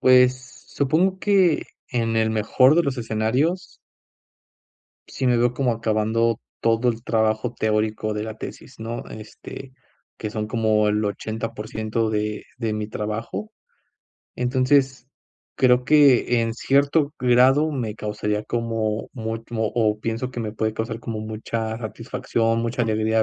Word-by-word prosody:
Pues, 130 0 +3
supongo 175 +7 +1
que 190 -6 +3 0.3
en 115 -2 0
el 110 0 +2
mejor 120 +6 +4
de 170 - +4
los 140 -4 -2
escenarios 125 - -1 1.3
sí 130 - -3
me 125 -1 +4
veo 120 +1 +2
como 125 -3 +1
acabando 110 0 0 0.2
todo 115 +2 +2
el 115 -1 -1
trabajo 110 +1 0
teórico 110 0 0
de 105 - -2
la 110 0 -6
tesis, 130 - -9
¿no?, 115 +1 -5
este, 110 +4 -10 0.5
que 105 - -4
son 105 -1 -3
como 110 -2 +2
el 105 +1 +1
80% 110 +1 -3
de 105 0 -2
de 115 -3 -1
mi 105 0 -3
trabajo. 110 - -4 0.9
Entonces, 130 +1 +1 0.5
creo 125 -1 +4
que, 135 -4 +5
en 115 0 -1
cierto 140 +3 +2
grado, 130 +5 +4
me 115 -6 -3
causaría 105 0 -2
como 115 -2 -2
mu 110 -2 -4
o 115 -1 -3
o 105 -2 +1
pienso 115 +3 -3
que 120 - -5
me 110 -2 -4
puede 110 0 -1
causar 115 0 -4
como 115 -2 -4
mucha 110 +1 -4
satisfacción, 115 0 -1
mucha 120 +1 -1
alegría 110 0 +2
115 Hz, 140 wpm, -23 LUFS, 110-125 Hz, 1.3 s, que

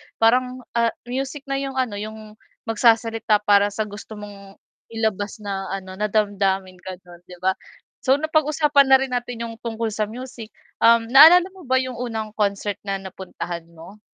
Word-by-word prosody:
parang, 250 +2 +2
ah, 235 -1 +1
music 270 +3 -4
na 275 -1 -2
yung 270 -1 -5
ano 235 -6 -1
yung 215 0 -9 0.2
magsasalita 225 -2 +2
para 205 0 +4
sa 205 +1 -3
gusto 210 +1 -10
mong 200 -1 -11 0.3
ilabas 215 -2 -3
na 195 -1 -4
ano 190 -1 -8
na 210 - +1
damdamin 195 -3 0
gano'n, 180 -1 -11
'di 180 - -11
ba? 190 - +3 0.5
So 265 0 +3
napag-usapan 300 -2 +2
na 265 0 +7
rin 265 - -6
natin 245 -1 -3
yung 230 -1 -6
tungkol 230 -1 -3
sa 210 0 -2
music, 245 -1 -9 0.3
um, 230 0 +5
naalala 325 +6 +9
mo 370 -8 -15
ba 260 - +2
yung 255 -2 -5
unang 220 -3 -4
concert 200 0 -1
na 195 - 0
napuntahan 175 -3 -7
mo? 170 +6 -13
220 Hz, 165 wpm, -22 LUFS, 200-255 Hz, 0.5 s, naalala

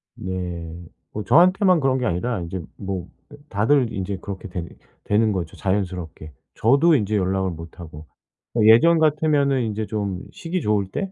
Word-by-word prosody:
네. 90 -2 -5 0.3
뭐 105 - -5
저한테만 180 - +4
그런 135 -2 +1
게 125 - -2
아니라 110 +4 -1
인제 85 +2 -5 0.2
뭐 95 -3 -5 0.4
다들 115 +4 +2
인제 95 0 -3
그렇게 100 -1 -7
되 90 -2 -5 0.4
되는 110 +1 +2
거죠 85 -5 -4
자연스럽게. 90 -5 -3 0.2
저도 140 +8 +4
인제 105 -3 0
연락을 95 0 0
못 85 +2 -10
하고. 80 -2 -10 0.6
예전 120 +11 +6
같으면은 150 -3 +2
인제 110 -2 -2
좀 100 -4 -3
시기 175 +2 -4
좋을 105 -5 0
때 195 - -3
105 Hz, 300 characters per minute, -22 LUFS, 90-135 Hz, 0.6 s, 예전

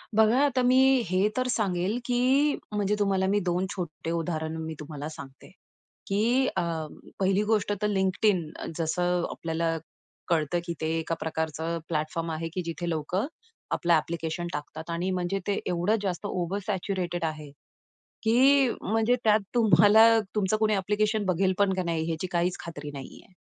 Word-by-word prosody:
बघा, 220 +3 +5
आता 265 -2 +1
मी 250 +1 +4 0.3
हे 185 +3 +3
तर 255 0 +1
सांगेल, 195 -3 0
की 260 +4 +3 0.2
म्हणजे 205 0 +1
तुम्हाला 195 -2 +1
मी 205 - +3
दोन 180 -1 0
छोट्टे 165 -3 -5
उदाहरण 160 -1 -2
मी 160 0 -4
तुम्हाला 150 -1 -6
सांगते, 135 -3 -11 0.6
की 235 +7 +2
अ, - - +3 0.6
पहिली 195 +2 +2
गोष्ट 210 -1 +1
तर 210 - +2
LinkedIn 190 0 +2 0.4
जसं 175 +2 0
आपल्याला 165 0 -2 0.5
कळतं, 165 -1 +1
की 170 - -3
ते 160 - 0
एका 165 +1 -2
प्रकारचं 160 +1 -2
प्लॅटफॉर्म 165 +1 -2
आहे, 160 +1 -3
की 185 - -2
जिथे 170 +1 -4
लोकं 170 - -1 0.5
आपलं 170 0 +2
ॲप्लिकेशन 165 +1 -1
टाकतात. 150 +2 -6
आणि 175 +3 -1
म्हणजे 185 +1 -1
ते 200 - +1
एवढं 180 +5 +1
जास्त 195 0 -3
ओव्हर 185 0 -2
सॅच्युरेटेड 185 -3 -2
आहे, 155 -2 -5 0.7
की 265 +4 +5
म्हणजे 225 +3 +2
त्यात 215 0 +5
तुम्हाला 215 -1 +6 0.3
तुमचं 210 0 +1
कुणी 215 -1 +3
ॲप्लिकेशन 210 +2 0
बघेल 185 +1 +2
पण 200 -1 +3
का 185 - -1
नाही 165 -1 -1
ह्याची 165 +2 -2
काहीच 175 +1 +1
खात्री 150 -3 -7
नाहीये. 140 +6 -10
185 Hz, 155 wpm, -27 LUFS, 165-210 Hz, 0.7 s, तुम्हाला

